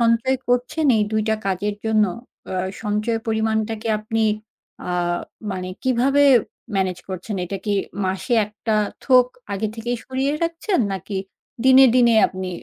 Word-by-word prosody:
সঞ্চয় 235 +3 +3
করছেন 250 +6 +1
এই 210 - +3
২ 215 - +2
টা 220 - +3
কাজের 200 +2 -1
জন্য 220 -1 +3 0.5
আ - - -2 0.3
সঞ্চয় 215 +2 0
পরিমাণটাকে 220 0 -1
আপনি 220 +1 -1 0.7
আ - - -1 0.6
মানে 185 -1 -4
কিভাবে 260 +2 +3 0.5
ম্যানেজ 185 -2 0
করছেন? 190 +3 -5
এটা 195 +3 -4
কি 210 - 0 0.3
মাসে 190 +6 -2
একটা 215 +1 -3 0.3
থোক 255 -2 +6 0.3
আগে 210 +2 -1
থেকেই 240 +2 -3
সরিয়ে 265 +2 -1
রাখছেন 335 +3 0
নাকি 195 +1 -5 0.5
দিনে, 265 0 +8
দিনে 240 -2 +5
আপনি 185 0 -6
220 Hz, 140 wpm, -22 LUFS, 205-250 Hz, 0.7 s, দিনে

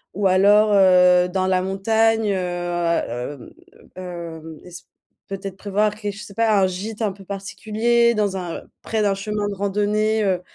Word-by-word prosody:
ou 205 - -1
alors, 205 +3 +4
heu, 180 -2 +5
dans 185 0 -1
la 185 -1 +1
montagne, 220 +3 +1
heu - - -1 0.8
heu, 125 +4 -5 0.6
mmh, - - -9
heu, 165 -3 -8
es 180 - -13 0.6
peut-être 195 -1 -7
prévoir 210 +1 0
ké 210 -1 -5
je 200 - -10
sais 200 - -11
pas, 220 -2 +2
un 190 - +4
gîte 205 +5 -4
un 205 - 0
peu 195 +1 -13
particulier, 220 +4 0
dans 205 -2 0
un 175 -3 -5 0.2
près 220 -1 -2
d'un 200 - +2
chemin 205 +1 -3
de 205 - -3
randonnée, 210 +2 0
heu, 185 -3 0
200 Hz, 170 wpm, -21 LUFS, 185-215 Hz, 0.8 s, heu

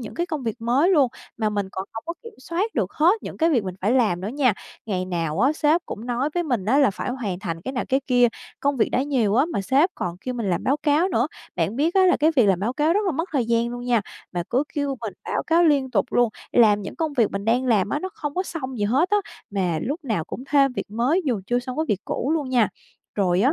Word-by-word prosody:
những 225 - -8
cái 345 +1 -1
công 310 -6 -4
việc 225 -1 -3
mới 255 +9 +2
luôn, 285 -8 +4 0.3
mà 215 -2 0
mình 205 -2 -1
còn 190 - -4
hổng 225 - -5
có 335 - -3
kiểm 460 -1 -11
soát 355 +11 -2
được - - -1
hết 355 +8 +3
những - - -7
cái 330 +1 +2
việc 240 -10 +2
mình 185 -1 -4
phải 210 +6 +1
làm 215 -9 +2
nữa 195 - -4
nha. 255 -2 +2 0.3
Ngày 185 -3 -1
nào 170 -1 -2
á, 270 +5 +4
sếp 310 +2 +2
cũng 225 +4 -7
nói 250 +5 -1
với 350 - +1
mình 245 - -1
á, 260 +8 +3
là 275 -7 +5
phải 195 - -4
hoàn 215 -8 -3
thành 165 -4 -4
cái 265 - -3
nào, 250 - -2
cái 265 +1 +2
kia, 245 -2 +4 0.3
công 280 -1 +1
việc 220 - +2
đã 255 - +1
nhiều 245 -8 +1
á, 265 +5 +4
mà 270 - -2
sếp 285 - +3
còn 175 0 -4
kêu 255 -1 -4
mình 225 -5 -2
làm 175 0 -1
báo 275 +3 +2
cáo 300 +5 +2
nữa. 245 -6 +1 0.3
Bạn 175 +8 -1
biết 320 +6 +1
á, 380 -1 +5
là 360 - +4
cái 310 +3 +3
việc 235 -5 +5
làm 190 -3 +3
báo 230 +5 0
cáo 305 +4 +2
rất 410 - +2
là 360 - +1
mất 330 +6 -2
thời 260 -5 +1
gian 235 0 +1
luôn 245 0 -6
nha, 240 -2 +2 0.3
mà 175 -1 -1
cứ 255 +4 +2
kêu 285 -2 -1
mình 220 -5 -4
báo - - -1
cáo 335 +1 +4
liên 280 -5 +3
tục 200 -6 +2
luôn, 245 -1 +4 0.2
làm 210 -4 +5
những 195 - -7
công 315 -3 -1
việc 235 -6 +2
mình 200 +1 -4
đang 240 +3 +2
làm 210 -5 +3
á, 295 - -1
nó 375 - -3
không 295 -9 -5
có 370 - 0
xong 265 -9 -6
gì 205 - +1
hết 275 - +2
á, 415 - +4 0.3
mà 185 -5 0
lúc 295 +4 -4
nào 210 -10 -1
cũng 255 - -7
thêm 275 -2 +4
việc 220 - -5
mới 255 - +1
dù 240 -8 0
chưa 245 0 +1
xong 250 +2 -6
cái 315 - +1
việc 200 -2 0
cũ 275 - -2
luôn 290 -5 -2
nha. 240 -5 +3 0.5
Rồi 185 -2 +2
á 270 +7 +4
250 Hz, 285 wpm, -23 LUFS, 210-295 Hz, 0.5 s, là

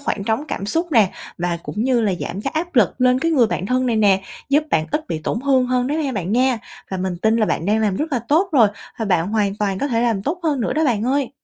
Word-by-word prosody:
khoảng 205 -8 -3
trống 225 +7 -1
cảm 195 - -4
xúc 330 - -1
nè, 215 -7 +5 0.3
và 175 -1 -1
cũng 210 +10 -3
như 255 -2 +2
là 210 -4 +1
giảm 190 - -4
cái 270 - -3
áp 335 +1 -3
lực 215 -8 +4
lên 250 0 +4
cái 330 +5 0
người 255 -8 +4
bạn 190 - -3
thân 255 +2 +1
này 230 -2 +1
nè, 195 -3 +3 0.3
giúp 295 +2 +3
bạn 155 0 +1
ít 300 +2 -2
bị 165 - -2
tổn 210 +8 -3
hương 265 -2 +2
hơn 250 0 0
đó 290 - -1
ha 270 - -2
bạn 195 -1 -3
nha. 255 -1 +2 0.3
Và 190 - -2
mình 185 -1 -3
tin 220 +1 +3
là 215 -2 +2
bạn 165 - -1
đang 210 +2 +2
làm 205 -3 +1
rất 305 -1 -3
là 250 - +2
tốt 340 +7 +3
rồi 235 -8 +6 0.3
và 225 - -1
bạn 180 -4 +1
hoàn 205 -2 0
toàn 200 -3 -1
có 285 - -1
thể 230 -3 0
làm 225 -5 0
tốt 335 - -3
hơn 295 -6 0
nữa 230 - -1
đó 315 +3 +1
bạn 230 -5 +1
ơi. 270 +1 0
230 Hz, 290 wpm, -20 LUFS, 200-275 Hz, 0.3 s, rồi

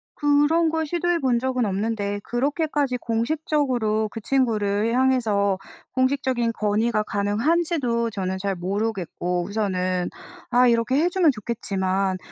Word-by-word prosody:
그런 295 +3 +3
걸 320 0 -1
시도해 345 +2 0
본 250 -4 +2
적은 255 -1 0
없는데 205 0 -2
그렇게까지 285 +1 0
공식적으로 235 -3 0
그 225 - -7
친구를 220 -4 +1
향해서 225 -7 +2 0.4
공식적인 260 -3 +1
건의가 215 +1 +1
가능한지도 235 - 0
저는 190 -3 -3
잘 195 0 -2
모르겠고 180 -2 -2
우선은 185 -3 -1 0.4
아 250 +1 +5
이렇게 235 +2 +2
해 335 +4 +3
주면 350 -5 +3
좋겠지만 195 -4 -2
230 Hz, 300 characters per minute, -23 LUFS, 205-275 Hz, 0.4 s, 아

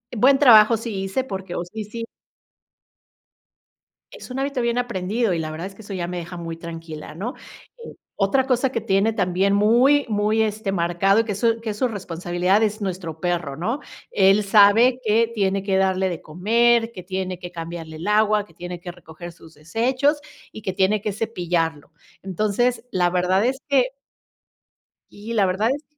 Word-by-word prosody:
buen 270 +5 +5
trabajo 230 -4 +7
sí 210 -4 -4
hice". 195 +7 -2
Porque 190 -6 -6
oh, 175 - -2
sí, 215 +4 -7
sí 230 +2 -7 2.0
es - - -11
un 265 - -4
hábito 275 -2 -1
bien 235 0 0
aprendido 220 -2 -1
y 165 - -1
la 155 -1 -4
verdad 165 +4 -5
es 195 - -13
que - - -13
eso 200 -1 -8
ya 175 -2 -3
me 180 0 -5
deja 175 +1 -7
muy 165 -1 -6
tranquila 165 -2 -8
¿no? 215 - -5 0.5
Eh, - - -10 0.2
otra 255 +7 +1
cosa 255 0 +1
que 230 - -2
tiene 205 +1 +1
también 195 -1 +1
muy, 245 +8 +4
muy 215 +1 +1
este, 215 -2 -1
marcado 180 +3 +2
y - - +3
que 210 - -2
es 200 - -6
su 230 -1 +1
que 225 - -4
es 205 - -7
su 255 - +1
responsabilidad 180 0 -1
es 215 0 -1
nuestro 175 -5 -5
perro, 175 -6 -2
¿no? 230 - -2 0.3
Él 195 +1 +4
sabe 215 +5 +5
que 225 +2 +2
tiene 195 -1 0
que 195 -1 0
darle 190 0 +1
de 170 - -5
comer, 230 +7 +2
que 180 -5 -10
tiene 185 -1 -4
que 175 0 -9
cambiarle 165 -2 -7
el 175 +6 -6
agua, 210 0 +3
que 165 - -23
tiene 175 0 -7
que 175 0 -7
recoger 175 0 -11
sus 160 0 -17
desechos 255 - 0 0.3
y 215 - -10
que 190 - -2
tiene 200 +2 +2
que 210 -2 -3
cepillarlo. 175 -8 -2 0.3
Entonces 215 +6 0
la 175 -1 +1
verdad 185 +4 +2
es 265 +2 -1
que 265 -2 +3 1.2
y 215 +3 -8
la 205 -3 +3
verdad 195 +5 +1
es 295 - -10
200 Hz, 185 wpm, -22 LUFS, 180-230 Hz, 2.0 s, trabajo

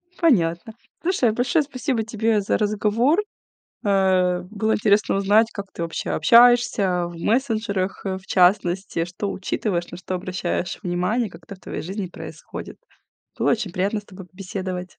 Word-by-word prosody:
Понятно. 195 - +1 0.3
Слушай, 330 - +2
большое 245 +7 +1
спасибо 255 -4 -2
тебе 220 -1 0
за 195 - 0
разговор. 215 - +2 0.7
Э. 185 -2 +2
Было 220 +1 0
интересно 210 -1 +2
узнать, 210 +3 +3
как 200 -1 -6
ты - - -5
вообще 165 -1 -4
общаешься 230 -3 +4
в 175 - -10
мессенджерах, 215 -3 -1
э, 190 -1 -2
в 190 - -20
частности, 180 -2 +2
что 185 +3 -4
учитываешь, 185 -2 -2
на - - -7
что 185 +1 -5
обращаешь 180 -1 -3
внимание, 185 +5 -1
как - - -14
это 200 - -9
в - - -27
твоей - - -6
жизни 190 +3 -4
происходит. 175 - -9 0.6
Было - - +2
очень 215 -6 -2
приятно 200 +4 -1
с 205 - -24
тобой 190 -2 -12
побеседовать. 185 0 -5
200 Hz, 150 wpm, -23 LUFS, 180-225 Hz, 0.7 s, общаешься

